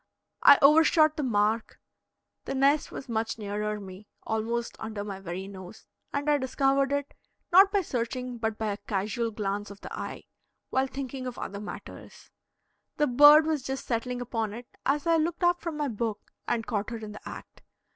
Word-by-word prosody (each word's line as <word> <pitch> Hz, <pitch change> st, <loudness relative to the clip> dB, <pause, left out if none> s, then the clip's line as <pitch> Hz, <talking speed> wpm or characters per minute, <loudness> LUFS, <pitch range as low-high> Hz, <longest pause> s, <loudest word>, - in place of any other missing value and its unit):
I 285 Hz, -, +9 dB
overshot 310 Hz, +1 st, +6 dB
the 305 Hz, -, -2 dB
mark; 220 Hz, -3 st, 0 dB, 0.7 s
the -, -, -3 dB
nest 280 Hz, +3 st, +3 dB
was -, -, -7 dB
much 225 Hz, -1 st, -2 dB
nearer 210 Hz, 0 st, -3 dB
me, 195 Hz, +1 st, -11 dB, 0.2 s
almost 230 Hz, +2 st, -2 dB
under 220 Hz, -2 st, -5 dB
my 200 Hz, -2 st, -6 dB
very 190 Hz, +1 st, -6 dB
nose, 190 Hz, +1 st, -11 dB, 0.3 s
and 285 Hz, +1 st, -2 dB
I 295 Hz, -1 st, +3 dB
discovered 270 Hz, +1 st, +1 dB
it, 285 Hz, 0 st, -2 dB, 0.4 s
not 385 Hz, +3 st, +7 dB
by 405 Hz, -1 st, +2 dB
searching 250 Hz, -4 st, -3 dB
but 220 Hz, -1 st, -2 dB
by 220 Hz, -1 st, -1 dB
a 200 Hz, -, -4 dB
casual 210 Hz, +3 st, -2 dB
glance 205 Hz, -1 st, -3 dB
of 200 Hz, 0 st, -12 dB
the -, -, -8 dB
eye, -, -, -6 dB, 0.5 s
while 265 Hz, +1 st, +2 dB
thinking 265 Hz, -1 st, -5 dB
of 250 Hz, -, -6 dB
other 200 Hz, -, -5 dB
matters. 210 Hz, -, -10 dB, 0.7 s
The 300 Hz, -, +3 dB
bird 295 Hz, +4 st, +8 dB
was 315 Hz, -3 st, 0 dB
just 265 Hz, +1 st, -5 dB
settling 245 Hz, +1 st, -2 dB
upon 225 Hz, -3 st, -2 dB
it 240 Hz, +2 st, -8 dB, 0.2 s
as 290 Hz, +3 st, +1 dB
I 335 Hz, -1 st, +4 dB
looked 335 Hz, +3 st, -1 dB
up 350 Hz, 0 st, +3 dB
from 335 Hz, -3 st, -4 dB
my 295 Hz, -1 st, 0 dB
book 220 Hz, -3 st, -4 dB, 0.2 s
and 225 Hz, -2 st, 0 dB
caught 210 Hz, -3 st, -2 dB
her 230 Hz, -, -4 dB
in 215 Hz, -1 st, -8 dB
the 210 Hz, -, -9 dB
act. -, -, -11 dB
240 Hz, 185 wpm, -28 LUFS, 210-285 Hz, 0.7 s, I